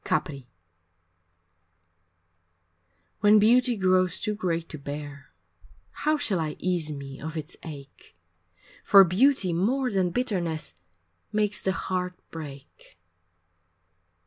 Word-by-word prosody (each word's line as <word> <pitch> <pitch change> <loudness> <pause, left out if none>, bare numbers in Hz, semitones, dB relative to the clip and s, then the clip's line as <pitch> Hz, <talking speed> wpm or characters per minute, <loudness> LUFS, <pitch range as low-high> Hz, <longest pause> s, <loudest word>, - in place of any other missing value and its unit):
IV - - -11
Capri 140 -7 -2 2.7
When 210 +1 +6
beauty 240 +3 +4
grows 185 -2 +2
too 215 - -1
great 170 -5 -2
to 155 - -7
bear 145 0 -7 0.6
How 305 0 0
shall 215 - 0
I 155 -2 -3
ease 175 -4 -1
me 140 -2 -8
of 160 +2 -5
its 155 +3 -6
ache, 140 - -11 0.7
For 195 -1 +8
beauty 190 +1 +2
more 250 +9 0
than 190 -3 +1
bitterness 175 - -2 0.6
Makes 210 -1 0
the 190 - 0
heart 180 -1 -3 0.2
break. 140 - -11
180 Hz, 110 wpm, -26 LUFS, 155-210 Hz, 2.7 s, For